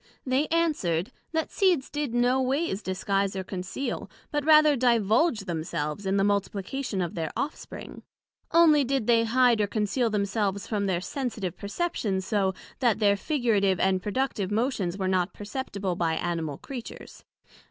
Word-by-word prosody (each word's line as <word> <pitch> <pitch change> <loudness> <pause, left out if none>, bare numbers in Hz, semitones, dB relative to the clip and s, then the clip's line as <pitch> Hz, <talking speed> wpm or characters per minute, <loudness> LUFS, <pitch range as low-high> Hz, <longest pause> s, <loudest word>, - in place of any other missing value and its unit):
They 265 +3 +1
answered, 260 - 0 0.2
That 320 -1 -1
seeds 360 -9 +2
did 295 -4 -2
no 245 +2 +2
ways 260 - 0
disguise 195 +1 -1
or 190 - -3
conceal, 185 +8 -4 0.2
but 295 -1 0
rather 305 -1 +6
divulge 235 - +3
themselves 165 0 -3
in 195 +1 +1
the 195 - +3
multiplication 200 +3 -1
of 170 - -4
their 160 -2 -3
off 300 - -1
spring; - - -10 0.5
onely 320 -3 +6
they 270 +1 +1
did 230 0 +2
hide 245 -1 +4
and 205 - 0
conceal 220 +3 0
themselves 200 -1 -1
from 205 -2 -1
their 180 -2 0
sensitive 215 - -4
perceptions 200 - -2
so, 195 -2 0 0.2
that 240 -5 +3
their 205 -2 +3
figurative 205 - +1
and 190 -1 +2
productive 210 -2 -1
motions 210 -5 -1
were 190 -1 -1
not 185 0 0
perceptible 205 -4 -4
by 165 -2 0
Animal 160 -4 -2
Creatures. 255 -4 -9
210 Hz, 155 wpm, -27 LUFS, 190-265 Hz, 0.5 s, rather